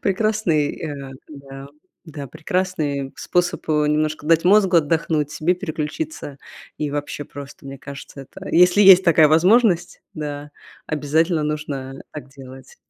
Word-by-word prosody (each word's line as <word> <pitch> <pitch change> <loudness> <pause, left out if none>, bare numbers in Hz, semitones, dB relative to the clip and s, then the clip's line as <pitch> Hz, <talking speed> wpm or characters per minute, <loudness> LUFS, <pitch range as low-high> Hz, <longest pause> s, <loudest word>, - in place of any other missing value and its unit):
прекрасный, 195 -7 0
э 140 -3 -6 0.2
Да, 140 -2 -11 0.4
да, 145 -4 -8
прекрасный 150 -3 -3
способ, 175 -1 -2
э, 150 -1 +2
немножко 155 0 -1
дать 165 +1 +3
мозгу 190 -1 +4
отдохнуть, 155 -1 0
себе 160 +4 0
переключиться, 155 -4 -5 0.4
и 150 -1 -2
вообще 145 0 -5
просто, 140 0 -11
мне 135 0 -8
кажется, 140 0 -10
это, 135 - -11
если 180 +4 +5
есть 190 -1 +8
такая 165 -3 +5
возможность, 180 +2 +3
да, 150 -1 -6 0.4
обязательно 155 +2 0
нужно 145 -3 -5
так 150 -2 -9
делать. 135 -1 -14
155 Hz, 130 wpm, -21 LUFS, 145-175 Hz, 0.4 s, есть